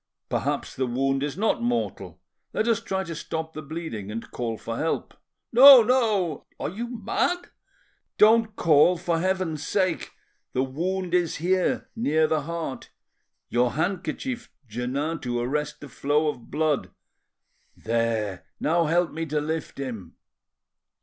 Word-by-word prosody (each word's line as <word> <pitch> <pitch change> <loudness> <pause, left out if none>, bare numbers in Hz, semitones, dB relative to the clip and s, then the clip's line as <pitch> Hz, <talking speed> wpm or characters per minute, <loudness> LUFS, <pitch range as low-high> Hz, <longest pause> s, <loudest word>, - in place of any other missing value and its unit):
Perhaps - - -2
the 130 - -1
wound 135 +2 0
is 145 +3 -3
not 220 +3 +1
mortal. 240 0 -2 0.3
Let 220 - 0
us 230 -1 +3
try 190 -4 -2
to 170 -2 -6
stop 160 0 -5
the 155 - -6
bleeding 145 - -6
and 115 +2 -6
call 115 -2 -3
for 115 +1 -5
help." 160 - -2 0.4
"No, 260 0 +10
no—" 215 - +1
"Are - - -2
you 230 +6 -4
mad?" 345 - -1 0.7
"Don't 220 0 +5
call, 165 +2 +5
for 170 -1 -1
Heaven's 180 -4 -1
sake! 185 -3 0 0.4
The 130 - +1
wound 175 +7 -2
is 175 -3 +2
here, 185 +3 0
near 160 -9 +2
the 155 -1 +1
heart. 165 -3 -5 0.6
Your 120 0 +2
handkerchief, 195 - -2 0.2
Jeannin, 135 +8 -2
to 120 -1 -2
arrest 145 +4 -2
the 145 - -8
flow 145 +4 +1
of 125 -5 -7
blood. 155 0 0 0.9
There—now 115 - -1
help 170 +1 +2
me 165 +1 -4
to 150 0 0
lift 155 +1 -4
him." 125 -9 -6
160 Hz, 140 wpm, -25 LUFS, 135-190 Hz, 0.9 s, No